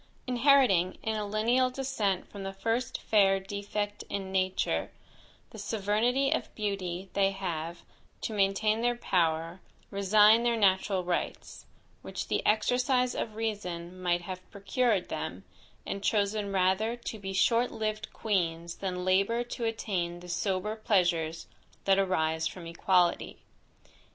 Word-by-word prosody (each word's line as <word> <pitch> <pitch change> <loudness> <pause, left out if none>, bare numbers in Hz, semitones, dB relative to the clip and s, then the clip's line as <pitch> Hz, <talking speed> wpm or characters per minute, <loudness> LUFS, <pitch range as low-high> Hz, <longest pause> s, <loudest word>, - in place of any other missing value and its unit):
Inheriting, 250 -8 +4
in 220 0 -1
a 210 -1 -2
lineal 235 +5 +2
descent 250 -8 -1
from 200 - -9
the 195 0 -5
first 230 +6 -2
fair 195 -3 +4
defect 205 +1 -4
in 195 -1 -4
nature, 185 0 0 0.6
the 220 - -10
sovereignty 225 +7 +1
of - - -4
beauty, 195 -3 -3
they 195 -1 +3
have, 170 -3 -4 0.4
to 220 - -3
maintain 210 +2 +2
their 240 0 +2
power, 170 -4 0 0.3
resigned 210 +3 +5
their 235 -1 +2
natural 190 -2 +2
rights, 175 0 -4 0.3
which - - -6
the - - 0
exercise 250 +3 +2
of 215 - -4
reason, 185 -5 -4
might 175 -1 +1
have 185 0 -8
procured 200 0 0
them, - - -4 0.4
and 195 - -4
chosen 205 -1 +1
rather 190 +4 +2
to 235 -2 -7
be 195 -1 -5
short 230 +6 +2
lived 215 -1 -3
queens 170 -5 -1
than 180 -2 -3
labour 195 +6 +2
to 240 -1 -5
attain 185 -6 -2
the 180 0 -11
sober 190 +3 -1
pleasures 175 -6 +1 0.4
that 195 0 +4
arise 160 -4 +1
from 175 0 -8
equality. 175 +1 +1
200 Hz, 135 wpm, -29 LUFS, 185-220 Hz, 0.6 s, resigned